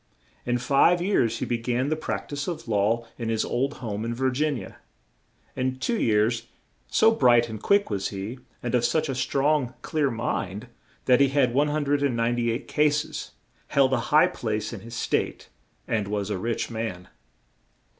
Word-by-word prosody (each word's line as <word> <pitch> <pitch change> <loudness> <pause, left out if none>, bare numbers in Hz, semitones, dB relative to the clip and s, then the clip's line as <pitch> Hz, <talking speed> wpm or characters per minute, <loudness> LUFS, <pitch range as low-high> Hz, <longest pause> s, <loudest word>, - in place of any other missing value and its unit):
In 120 0 +2
five 140 +8 +4
years 150 - +1
he - - -2
be 120 - -1
gan 125 +3 -1
the 155 - +1
prac 155 - -4
tise 145 -1 -4
of 170 -7 -5
law 110 +2 +1
in 115 -1 -2
his 110 -1 0
old 135 +4 -1
home 105 -1 -3
in 115 +1 -3
Vir 130 +1 +1
gin 145 +2 0
ia. 95 - -9 0.8
In 130 0 -1
two 225 - -1
years, 110 +2 +2 0.4
so 220 0 +4
bright 120 - +4
and 110 -2 -7
quick 200 - +2
was 100 -1 -1
he, 100 +6 -6 0.2
and 120 - -3
of 125 -1 +3
such 155 +4 +1
a - - 0
strong, 135 0 +1
clear 150 -3 0
mind, 110 -3 -3 0.4
that 125 -1 +5
he 140 - +6
had 135 -3 +2
198 135 -5 +1
cas 150 0 +2
es, - - -7 0.4
held 135 -1 +3
a 125 - +2
high 150 +1 +6
place 110 -1 -3
in - - -6
his 115 +1 -9
State, - - -2 0.4
and 105 -3 0
was 105 0 -2
a 95 - -2
rich 115 +3 -2
man. 110 -6 -4
120 Hz, 175 wpm, -25 LUFS, 115-140 Hz, 0.8 s, he